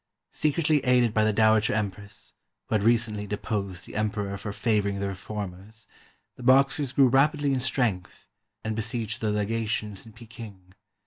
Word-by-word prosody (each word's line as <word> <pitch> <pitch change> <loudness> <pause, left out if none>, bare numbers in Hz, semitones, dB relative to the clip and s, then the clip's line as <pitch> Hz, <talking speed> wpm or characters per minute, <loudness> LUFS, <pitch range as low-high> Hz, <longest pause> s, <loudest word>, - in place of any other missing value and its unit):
Secretly 150 0 +1
aided 125 -3 +3
by 110 - +3
the 110 - +3
Dowager 110 0 +3
Empress, 100 -1 -4 0.3
who - - -5
had 110 - +3
recently 110 -2 +1
deposed 100 -3 -3
the - - -11
Emperor 105 -2 -1
for 100 +1 -5
favoring 100 -2 0
the 100 - -1
reformers, 100 +2 -6 0.5
the - - -11
Boxers 135 +1 +4
grew 135 0 +5
rapidly 140 +2 +3
in 130 - +1
strength 120 -8 -1 0.4
and 110 0 -2
besieged 115 +1 -3
the 110 - 0
legations 105 -1 -2
in 110 - -13
Peking. 110 -5 -12
110 Hz, 150 wpm, -27 LUFS, 100-120 Hz, 0.5 s, grew